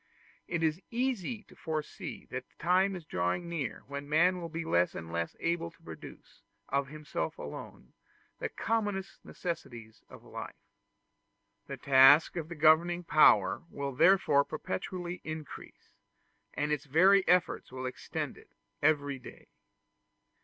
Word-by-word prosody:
It 170 -1 -1
is 160 +3 +1
easy 240 -3 -2
to - - -19
foresee 155 -2 -5
that 130 0 -5
the - - -33
time 185 +3 +2
is 175 -3 -8
drawing 90 - -1
near 165 -7 -4
when 140 +1 -7
man 175 +4 +3
will 170 - -5
be 165 +1 -4
less 85 - +2
and 80 0 -7
less 85 0 -2
able 170 0 -1
to 165 - -25
produce, 80 -1 -12 0.3
of 140 0 0
himself 150 +2 -4
alone, - - -9 0.5
the - - -2
commonest 205 -4 -2
necessaries 125 - -6
of - - -13
life. - - -8 1.1
The - - -6
task 140 +3 +6
of 165 -2 -4
the 170 - -6
governing 165 +3 +4
power 105 - +5
will 140 -1 -4
therefore 160 -1 +5
perpetually 180 +3 -5
increase, 155 -1 -9 0.6
and 150 +1 -1
its 150 0 -1
very 185 +7 +5
efforts 180 -6 +2
will 130 0 -5
extend 130 - -5
it - - -20 0.3
every 145 -2 +2
day. 125 - -13
155 Hz, 140 wpm, -31 LUFS, 140-175 Hz, 1.1 s, task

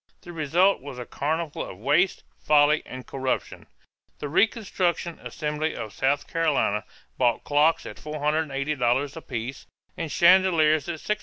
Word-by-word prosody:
The 175 - -10
result 170 +4 +2
was 140 -2 -8
a 125 - -6
carnival 155 +3 -2
of - - -9
waste, 145 - +1 0.2
folly, 150 0 +4
and 130 0 -8
corruption. 130 -1 -3 0.5
The 145 - -5
"reconstruction" 180 - 0
assembly 150 +1 -3
of 110 -3 -6
South 140 +2 0
Carolina 150 -10 0 0.3
bought 120 -3 +2
clocks 150 +3 +2
at - - -8
$480 145 -3 -1
apiece 130 -5 -6 0.3
and 165 -3 -4
chandeliers 170 -4 +4
at 170 - -2
$650. 210 - -1
150 Hz, 135 wpm, -25 LUFS, 135-165 Hz, 0.5 s, folly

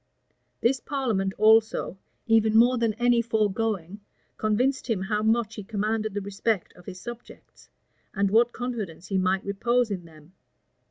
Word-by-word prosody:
This 260 +3 +2
parliament 230 -10 -1
also, 220 -2 +3 0.3
even 220 -1 +3
more 245 +2 +5
than 225 -2 0
any 240 0 +3
foregoing, 210 -4 -1 0.4
convinced 250 +5 0
him 200 -5 0
how 210 +2 -1
much 220 0 +1
he 210 - -7
commanded 215 0 -2
the 205 - -1
respect 200 0 -2
of 180 - -18
his 180 - -8
subjects, 240 +4 -11 0.4
and 200 -1 0
what 235 +2 +4
confidence 215 -10 -5
he 195 -2 +1
might 185 +1 0
repose 235 +3 0
in 180 -3 -4
them. 160 +1 -17
215 Hz, 150 wpm, -26 LUFS, 195-235 Hz, 0.4 s, more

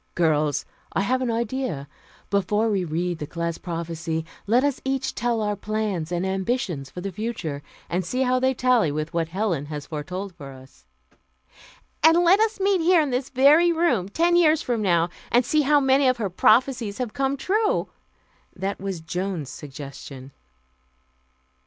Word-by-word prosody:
"Girls, 150 -4 +1 0.3
I - - +1
have 255 +6 0
an 255 - -1
idea. 230 - -2 0.4
Before 210 +3 +1
we 195 -3 +1
read 170 +1 -2
the 150 - -5
class 170 0 -3
prophecy, 165 -1 -4 0.2
let 240 +5 +4
us 285 -2 0
each 270 0 -1
tell 240 -2 -1
our 210 -1 0
plans 205 -5 -3
and 175 +1 -1
ambitions 190 - -2
for 180 - -8
the 195 +1 -4
future, 185 -8 -4 0.3
and 180 +2 -1
see 255 +9 -1
how 255 0 +2
they 260 +1 +1
tally 245 - +3
with 155 +2 -4
what 165 -1 0
Helen 175 -5 -2
has 150 -1 -6
foretold 180 +6 -5
for 140 -4 -10
us 130 - -17 0.6
" - - -25
"And 325 +2 +7
let 365 +4 +5
us 445 -1 +1
meet 390 -2 +2
here 350 +1 +5
in 295 -4 +1
this 250 +1 -1
very 295 +6 +5
room, 280 - +1
ten 340 +10 +2
years 320 -2 +4
from 240 -3 -1
now, 175 -4 +2 0.2
and 240 +1 +4
see 305 +4 +2
how 295 +1 +4
many 270 0 +3
of 255 -1 +3
her 205 -5 -2
prophecies 235 +1 +2
have 245 -4 -3
come 275 0 0
true." 420 +8 +1 0.7
That 195 +1 -3
was 195 -4 -4
Joan's 175 -3 -4
suggestion. 140 -2 -9
205 Hz, 170 wpm, -24 LUFS, 165-260 Hz, 0.7 s, And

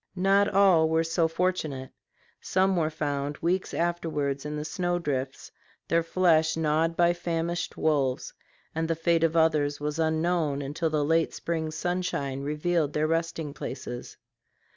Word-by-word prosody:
Not 195 +2 +3
all 185 -5 +5
were 160 0 +2
so 165 0 +1
fortunate. 160 -6 -2 0.5
Some 190 +1 +2
were 160 -3 +1
found 145 -2 -3
weeks 185 +3 -1
afterwards 155 -5 -1
in 150 - -4
the 150 0 -4
snow 175 +1 -1
drifts, 135 -5 -3 0.4
their 165 0 +3
flesh 165 -2 +2
gnawed 160 +1 +1
by 175 0 +4
famished 170 0 -3
wolves; 140 -5 0 0.4
and 160 0 -1
the 165 - 0
fate 165 0 +1
of 165 0 +2
others 150 -3 +2
was 150 +2 -3
unknown 160 -2 +1
until 150 +4 -2
the 150 -2 0
late 165 +1 +1
spring 160 -2 -2
sunshine 155 -5 -2
revealed 150 +1 0
their 150 0 +1
resting 165 -2 -1
places. - - -7
160 Hz, 145 wpm, -27 LUFS, 150-170 Hz, 0.5 s, all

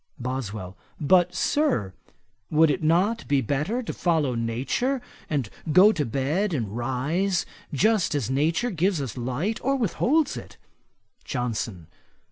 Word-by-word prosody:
BOSWELL. 110 -7 -4 0.2
'But, 175 +3 +3
Sir, 260 - +1 0.6
would 155 0 +4
it 180 - -2
not 180 +9 +2
be 140 -1 +3
better 150 - -1
to - - -4
follow 160 -7 +1
Nature; 125 - -1 0.3
and 140 -7 0 0.2
go 190 +7 +7
to 165 -8 -1
bed 150 - 0
and 110 -6 -3
rise 145 +10 0 0.3
just 195 +2 +2
as 140 -7 0
nature 160 - +1
gives 180 0 +1
us 135 -5 -4
light 135 - -2
or 275 +2 +2
with 230 -9 0
holds 305 +4 +2
it?' - - -10 0.7
JOHNSON. 115 - -3
150 Hz, 135 wpm, -25 LUFS, 125-195 Hz, 0.7 s, go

